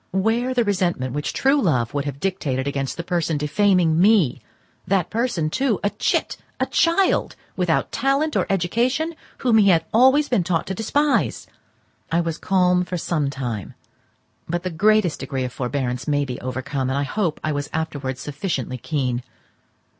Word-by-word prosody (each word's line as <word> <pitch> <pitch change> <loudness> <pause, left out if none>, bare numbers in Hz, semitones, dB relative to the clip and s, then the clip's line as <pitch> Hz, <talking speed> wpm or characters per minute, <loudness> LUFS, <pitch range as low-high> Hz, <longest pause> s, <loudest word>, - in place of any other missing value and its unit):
Where 230 +6 +1
the 240 - +3
resentment 175 - 0
which 145 +1 -2
true 275 +2 +2
love 125 - +1
would 145 0 -1
have 140 -1 -5
dictated 145 -9 -1
against 140 -1 -2
the 170 - -3
person 170 -3 -1
defaming 165 +2 +2
me—that 195 - 0
person, 215 -9 -1
too, 260 -3 +1
a 205 - +1
chit, - - -1 0.2
a - - +2
child, 345 +3 +2 0.2
without - - 0
talent 275 +3 +1
or - - +1
education, 240 - 0 0.2
whom 235 -4 +3
he 200 -2 +5
had 170 -3 +5
been - - -34
always 265 +6 +5
taught 180 -8 0
to 190 - -3
despise? 285 +8 0 0.7
I 165 - +2
was 165 -1 -2
calm 180 -1 +2
for 180 0 -4
some 155 -4 -1
time; 125 -8 -5 0.7
but 175 +1 -2
the 185 - -3
greatest 205 +1 +2
degree 135 -1 -3
of 125 -1 -4
forbearance 125 0 -3
may 145 -1 +1
be 130 0 -6
overcome, 130 +1 -3
and 135 - -1
I 140 - +1
hope 170 +2 -1
I 155 - 0
was 145 0 -3
afterwards 145 -5 -3
sufficiently 140 - -3
keen. 130 -5 -1
170 Hz, 165 wpm, -22 LUFS, 140-215 Hz, 0.7 s, he